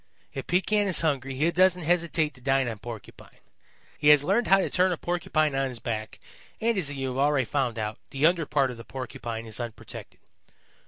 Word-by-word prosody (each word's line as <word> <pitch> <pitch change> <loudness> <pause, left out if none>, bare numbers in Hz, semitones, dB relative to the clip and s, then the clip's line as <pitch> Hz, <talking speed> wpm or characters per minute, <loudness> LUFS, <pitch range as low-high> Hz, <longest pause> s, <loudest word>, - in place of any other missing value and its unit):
If 135 - -6
Pekan 205 +3 +2
is 185 - +2
hungry 135 -4 -1
he 155 +6 +2
doesn't 180 0 +3
hesitate 165 -2 +1
to 130 - -18
dine 135 0 +2
on 115 -3 -4
Porcupine. 115 -1 -10 0.6
He 150 - +1
has 150 -1 +8
learned 200 +9 +2
how 195 - +6
to 195 - +1
turn 185 0 +2
a 175 - -1
Porcupine 155 -4 0
on 135 0 +1
his 125 -2 -5
back, 110 -2 -5 0.4
and, 230 +1 +1
as 165 -7 -1
you 135 -2 -3
have 130 +1 -3
already 140 -2 +3
found 125 -3 -1
out, 105 -1 -3
the 140 +2 0
under 165 -2 +3
part 140 -3 +2
of 120 - -9
the 115 - -9
Porcupine 120 -3 -6
is 110 0 -5
unprotected. 120 -2 -8
140 Hz, 205 wpm, -27 LUFS, 125-175 Hz, 0.6 s, has